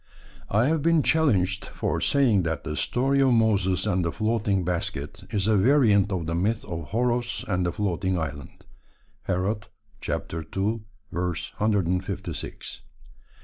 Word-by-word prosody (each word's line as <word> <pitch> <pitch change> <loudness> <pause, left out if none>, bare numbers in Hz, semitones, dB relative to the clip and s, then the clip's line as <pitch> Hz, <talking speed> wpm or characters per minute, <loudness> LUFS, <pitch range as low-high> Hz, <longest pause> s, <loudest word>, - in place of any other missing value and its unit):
I 110 +4 +3
have 155 +2 +1
been 165 -1 +3
challenged 100 - +2
for - - -2
saying 125 -9 +3
that 80 -2 -2
the 75 - -4
story 135 - +1
of 130 -2 +4
Moses 100 -5 +2
and 90 0 +1
the 85 - 0
floating 105 -3 0
basket 85 -5 -3
is 105 -4 0
a 110 0 +3
variant 105 -3 +4
of 90 -4 -2
the 85 - -2
myth 105 +6 0
of 85 -1 -6
Horos 120 +1 0
and 90 -3 0
the - - 0
floating 95 -2 -1
island 70 -4 -6 0.6
(Herod 100 +4 -1 0.4
ii. 95 +7 -2 0.3
156). 90 +1 -2
100 Hz, 135 wpm, -26 LUFS, 90-115 Hz, 0.6 s, of